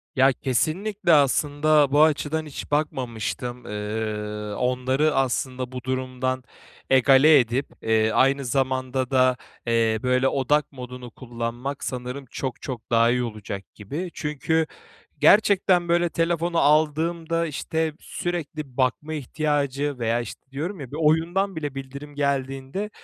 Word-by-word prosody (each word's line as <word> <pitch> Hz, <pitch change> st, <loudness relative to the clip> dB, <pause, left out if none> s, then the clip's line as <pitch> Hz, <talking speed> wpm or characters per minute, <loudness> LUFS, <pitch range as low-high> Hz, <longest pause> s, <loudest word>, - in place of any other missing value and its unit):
Ya, 135 Hz, 0 st, +5 dB
kesinlikle 170 Hz, -, 0 dB
aslında 145 Hz, 0 st, +3 dB
bu 145 Hz, +2 st, +6 dB
açıdan 155 Hz, 0 st, +1 dB
hiç 150 Hz, -1 st, -8 dB
bakmamıştım. 125 Hz, -4 st, -2 dB
Eee, 105 Hz, 0 st, -4 dB
onları 130 Hz, +4 st, +1 dB
aslında 130 Hz, -1 st, -1 dB
bu 125 Hz, -1 st, -6 dB
durumdan 130 Hz, 0 st, -2 dB, 0.5 s
egale 135 Hz, +3 st, +6 dB
edip, 125 Hz, +3 st, 0 dB
eee, 110 Hz, 0 st, +2 dB
aynı 135 Hz, +3 st, +3 dB
zamanda 130 Hz, 0 st, -1 dB
da, 130 Hz, -1 st, +4 dB, 0.3 s
eee, 115 Hz, -1 st, +2 dB
böyle 125 Hz, +1 st, +2 dB
odak 145 Hz, +2 st, +1 dB
modunu 125 Hz, -2 st, -9 dB
kullanmak 120 Hz, +3 st, -5 dB
sanırım 125 Hz, +2 st, -5 dB
çok 130 Hz, -3 st, -4 dB
çok 120 Hz, -4 st, -6 dB
daha 115 Hz, 0 st, +5 dB
iyi 125 Hz, 0 st, +1 dB
olacak 105 Hz, -4 st, -6 dB
gibi. 145 Hz, -, -5 dB
Çünkü 155 Hz, +2 st, -1 dB, 0.5 s
gerçekten 190 Hz, -4 st, +4 dB
böyle 175 Hz, 0 st, +3 dB
telefonu 170 Hz, +1 st, 0 dB
aldığımda, 160 Hz, +3 st, +2 dB
işte, 160 Hz, +1 st, -2 dB
sürekli 155 Hz, -6 st, -5 dB
bakma 135 Hz, +4 st, 0 dB
ihtiyacı 145 Hz, -1 st, -1 dB
veya, 115 Hz, 0 st, +1 dB
işte, 120 Hz, -, -8 dB
diyorum 165 Hz, +8 st, -4 dB
ya 135 Hz, -4 st, -8 dB
bir 145 Hz, -, -5 dB
oyundan 165 Hz, +5 st, +2 dB
bile 145 Hz, -3 st, -4 dB
bildirim 140 Hz, +2 st, -8 dB
geldiğinde, 140 Hz, +6 st, -2 dB
135 Hz, 125 wpm, -24 LUFS, 125-155 Hz, 0.5 s, bu